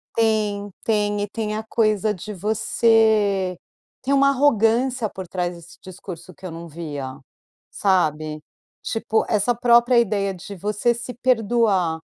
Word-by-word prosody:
Tem, 210 Hz, -2 st, +1 dB
tem 205 Hz, -2 st, 0 dB
e -, -, -3 dB
tem 215 Hz, -1 st, -3 dB
a 215 Hz, -, -3 dB
coisa 215 Hz, -1 st, +1 dB
de 210 Hz, +3 st, -7 dB
você 210 Hz, -2 st, +2 dB, 0.4 s
tem 275 Hz, -, 0 dB
uma 275 Hz, 0 st, +5 dB
arrogância 245 Hz, -3 st, +2 dB
por 190 Hz, -1 st, -8 dB
trás 175 Hz, 0 st, -3 dB
desse 170 Hz, 0 st, -14 dB
discurso 185 Hz, -1 st, -10 dB
que 185 Hz, +5 st, -14 dB
eu 175 Hz, -, -5 dB
não 165 Hz, +1 st, -8 dB
via, 145 Hz, -5 st, -6 dB, 0.5 s
sabe? 155 Hz, -6 st, 0 dB, 0.4 s
Tipo, 225 Hz, -1 st, -1 dB
essa 215 Hz, +3 st, +2 dB
própria 240 Hz, +1 st, +5 dB
ideia 200 Hz, -3 st, 0 dB
de 190 Hz, +2 st, -9 dB
você 210 Hz, +5 st, 0 dB
se 245 Hz, +1 st, -7 dB
perdoar, 225 Hz, -8 st, +1 dB
210 Hz, 140 wpm, -22 LUFS, 185-225 Hz, 0.5 s, uma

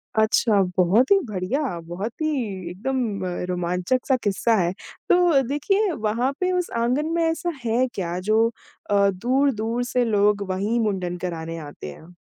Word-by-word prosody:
अच्छा, 220 Hz, -1 st, +3 dB, 0.2 s
बहुत 200 Hz, -, +4 dB
ही 395 Hz, -, +7 dB
बढ़िया 205 Hz, -, -2 dB
बहुत 190 Hz, +7 st, -4 dB
ही 310 Hz, -, +1 dB, 0.4 s
एकदम 215 Hz, 0 st, -2 dB, 0.3 s
रोमांचक-सा 180 Hz, +9 st, 0 dB
किस्सा 215 Hz, +3 st, +2 dB
है, 175 Hz, +1 st, +1 dB, 0.4 s
तो 350 Hz, -6 st, +5 dB
देखिए 385 Hz, -, +1 dB
वहाँ 235 Hz, 0 st, 0 dB
पे 365 Hz, 0 st, +1 dB
उस 360 Hz, -1 st, -1 dB
आँगन 250 Hz, +6 st, +1 dB
में 335 Hz, -, +2 dB
ऐसा 325 Hz, +2 st, 0 dB, 0.2 s
है 240 Hz, +3 st, +2 dB
क्या 175 Hz, -2 st, -3 dB
जो 215 Hz, +4 st, +3 dB, 0.4 s
अ, 200 Hz, -1 st, +4 dB
दूर-दूर 240 Hz, +2 st, 0 dB
से 250 Hz, 0 st, 0 dB
लोग 205 Hz, -1 st, +2 dB
वही 200 Hz, +5 st, 0 dB
मुंडन 185 Hz, -5 st, -1 dB
कराने 165 Hz, -2 st, -5 dB
आते 145 Hz, -, -8 dB
हैं? 165 Hz, -, -14 dB
220 Hz, 145 wpm, -23 LUFS, 185-265 Hz, 0.4 s, ही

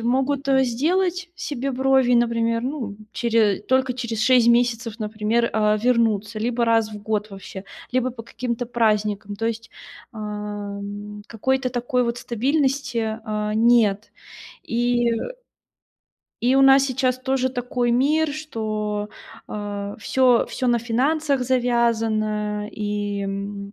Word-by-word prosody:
могут, 265 Hz, +4 st, 0 dB
э, 265 Hz, -1 st, +4 dB
сделать 355 Hz, +9 st, 0 dB
себе 275 Hz, -5 st, -3 dB
брови, 265 Hz, -1 st, +3 dB
и, -, -, +6 dB
например, 230 Hz, -1 st, +1 dB
ну, 250 Hz, -6 st, -4 dB, 0.2 s
чере 225 Hz, -4 st, +2 dB
только 260 Hz, +3 st, +1 dB
через 235 Hz, -3 st, -3 dB
6 250 Hz, -1 st, +5 dB
месяцев, 235 Hz, -1 st, +2 dB
например, 215 Hz, +2 st, 0 dB
э, 210 Hz, -1 st, +2 dB
вернуться 225 Hz, -3 st, +1 dB
либо 235 Hz, +2 st, 0 dB
раз 225 Hz, -2 st, +2 dB
в 210 Hz, -, -8 dB
год 215 Hz, 0 st, -2 dB
вообще, 195 Hz, 0 st, -9 dB, 0.3 s
либо 255 Hz, 0 st, +1 dB
по 235 Hz, -2 st, -9 dB
каким-то 235 Hz, +1 st, -4 dB
праздникам. 210 Hz, -3 st, 0 dB
То 225 Hz, +3 st, -2 dB
есть, 225 Hz, 0 st, -4 dB, 0.4 s
ам, 205 Hz, -1 st, -6 dB
какой-то 260 Hz, +3 st, 0 dB
такой 250 Hz, 0 st, 0 dB
вот 235 Hz, 0 st, -2 dB
стабильности, 245 Hz, -3 st, 0 dB
а, 210 Hz, -1 st, -2 dB
нет. 220 Hz, -2 st, +3 dB, 0.5 s
И, 240 Hz, 0 st, +1 dB
э 230 Hz, -, 0 dB, 1.2 s
и 250 Hz, +2 st, +3 dB
у 270 Hz, -, +5 dB
нас 270 Hz, 0 st, +7 dB
сейчас 260 Hz, -1 st, 0 dB
тоже 260 Hz, 0 st, 0 dB
такой 245 Hz, -1 st, -1 dB
мир, 290 Hz, +5 st, +2 dB
что, 215 Hz, -8 st, -3 dB, 0.4 s
э, 205 Hz, -1 st, -5 dB
всё 250 Hz, +2 st, +3 dB
всё 255 Hz, -, -3 dB
на 240 Hz, -1 st, +3 dB
финансах 275 Hz, +4 st, 0 dB
завязано. 225 Hz, -4 st, 0 dB
И, 205 Hz, -1 st, -3 dB
м, 200 Hz, 0 st, -5 dB
235 Hz, 130 wpm, -23 LUFS, 210-255 Hz, 1.2 s, нас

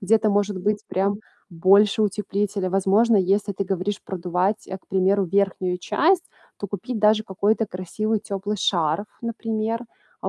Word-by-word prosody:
Где-то, 215 Hz, +2 st, +3 dB
может 205 Hz, -1 st, 0 dB
быть, 205 Hz, +3 st, -1 dB
прям 200 Hz, +2 st, 0 dB, 0.3 s
больше 200 Hz, +5 st, +4 dB
утеплителя. 205 Hz, -1 st, -1 dB
Возможно, 195 Hz, +4 st, +3 dB
если 200 Hz, +2 st, +1 dB
ты 195 Hz, -, -3 dB
говоришь 195 Hz, +1 st, -2 dB
продувать, 185 Hz, +3 st, -2 dB
э, 190 Hz, -, -4 dB
к -, -, -36 dB
примеру, 195 Hz, +1 st, +2 dB
верхнюю 185 Hz, -1 st, 0 dB
часть, 355 Hz, -, +2 dB, 0.3 s
то 200 Hz, -, -4 dB
купить 220 Hz, +5 st, -4 dB
даже 215 Hz, +1 st, +4 dB
какой-то 210 Hz, +3 st, 0 dB
красивый 210 Hz, +4 st, -2 dB
тёплый 205 Hz, +2 st, -4 dB
шарф, 170 Hz, +1 st, 0 dB, 0.2 s
например. 225 Hz, 0 st, -3 dB, 0.4 s
А -, -, -1 dB
200 Hz, 145 wpm, -23 LUFS, 190-215 Hz, 0.4 s, больше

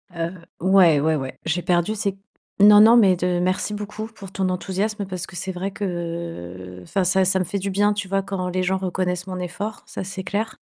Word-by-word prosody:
Heu 170 Hz, +2 st, -3 dB, 0.2 s
ouais, 180 Hz, -4 st, +5 dB
ouais, 160 Hz, +2 st, +2 dB
ouais. 135 Hz, -3 st, -5 dB
J'ai 165 Hz, +2 st, 0 dB
perdu 175 Hz, +4 st, +1 dB
ces 200 Hz, -2 st, -2 dB, 0.4 s
non, 205 Hz, +1 st, +9 dB
non, 225 Hz, +3 st, +8 dB
mais 195 Hz, -5 st, +6 dB
de 180 Hz, 0 st, 0 dB
merci 185 Hz, +3 st, 0 dB
beaucoup 210 Hz, +1 st, -6 dB
pour 200 Hz, -4 st, -12 dB
ton 190 Hz, -1 st, -1 dB
enthousiasme, 200 Hz, +3 st, -2 dB
parce 185 Hz, -2 st, -5 dB
que 185 Hz, -, -13 dB
c'est 190 Hz, +2 st, -4 dB
vrai 185 Hz, +2 st, -3 dB
qu'enfin 165 Hz, -, -4 dB
ça 190 Hz, +2 st, +3 dB
ça 190 Hz, +1 st, +2 dB
me -, -, +1 dB
fait 200 Hz, +3 st, -3 dB
du 195 Hz, +1 st, -3 dB
bien, 205 Hz, +2 st, +2 dB
tu 205 Hz, -1 st, -4 dB
vois? 195 Hz, +1 st, 0 dB
Quand 190 Hz, -2 st, -3 dB
les 185 Hz, +1 st, -1 dB
gens 190 Hz, +1 st, +1 dB
reconnaissent 180 Hz, -1 st, -2 dB
mon 185 Hz, -1 st, -4 dB
effort, 195 Hz, +4 st, -5 dB
ça, -, -, -6 dB
c'est 190 Hz, 0 st, -6 dB
clair. 205 Hz, +4 st, -3 dB
185 Hz, 215 wpm, -23 LUFS, 175-200 Hz, 0.4 s, non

